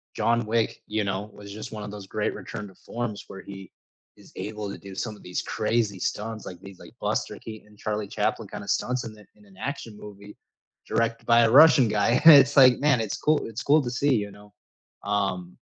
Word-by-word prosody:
John 115 -1 +1
Wick, 115 +1 -1
you 105 0 -1
know, 100 +2 -3
was 100 -1 -11
just 110 +2 -8
one 105 -1 -6
of 105 - -7
those 100 -2 -9
great - - -2
return 105 -1 -7
to 95 - -16
forms 120 -3 -6
where 95 - -10
he 95 -2 -11 0.5
is - - -18
able 105 -1 -5
to - - -7
do 95 -1 -11
some 110 0 -4
of - - -17
these 90 - -3
crazy 110 -5 -1
stunts, 110 +3 -4
like, 90 -2 -9
these, 95 -2 -12
like, - - -14
Buster - - -2
Keaton 110 -1 -10
and 105 -1 -20
Charlie 105 -1 -3
Chaplin - - -2
kinda 100 - -8
stunts 125 0 -1
in 110 -1 -8 0.3
an 95 -1 -20
action 130 -6 -5
movie 105 0 -12 0.5
directed 115 0 -1
by 120 0 +6
a 115 -1 +3
Russian 140 -3 +7
guy. 105 +2 +2
It's 145 -3 +8
like, 130 -2 +7
man, 140 -3 +3
it's 110 - -3
cool 155 0 +1
It's 115 +1 -6
cool 150 +2 +4
to 120 - -4
see, 135 +1 +1
you 105 -2 -2
know, 105 +1 -16 0.5
um, 95 -3 -2
105 Hz, 210 wpm, -25 LUFS, 100-120 Hz, 0.5 s, It's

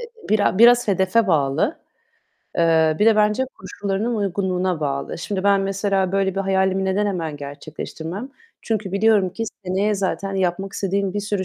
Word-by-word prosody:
e 470 -2 -12
bira 205 -2 +2
biraz 240 -1 +6
hedefe 195 +3 +2
bağlı. 155 - +1 0.8
Eee, 160 -2 +3
bir 210 - +3
de 220 -1 +5
bence 210 +4 +2
koşullarının 200 +4 -3
uygunluğuna 185 -3 -1
bağlı. 140 0 -3
Şimdi 190 +3 -4
ben 200 -1 +4
mesela 195 -1 0
böyle 195 -1 +1
bir 195 - -1
hayalimi 190 0 +1
neden 190 +2 +1
hemen 165 -7 -3
gerçekleştirmem? 160 - -7 0.3
Çünkü 215 -4 -2
biliyorum 200 -2 +3
ki 225 +5 -4 0.2
seneye 195 +3 0
zaten 195 0 -2
yapmak 190 +1 -1
istediğim 195 0 -1
bir 205 - -1
sürü 205 -2 -2
195 Hz, 155 wpm, -21 LUFS, 180-205 Hz, 0.8 s, biraz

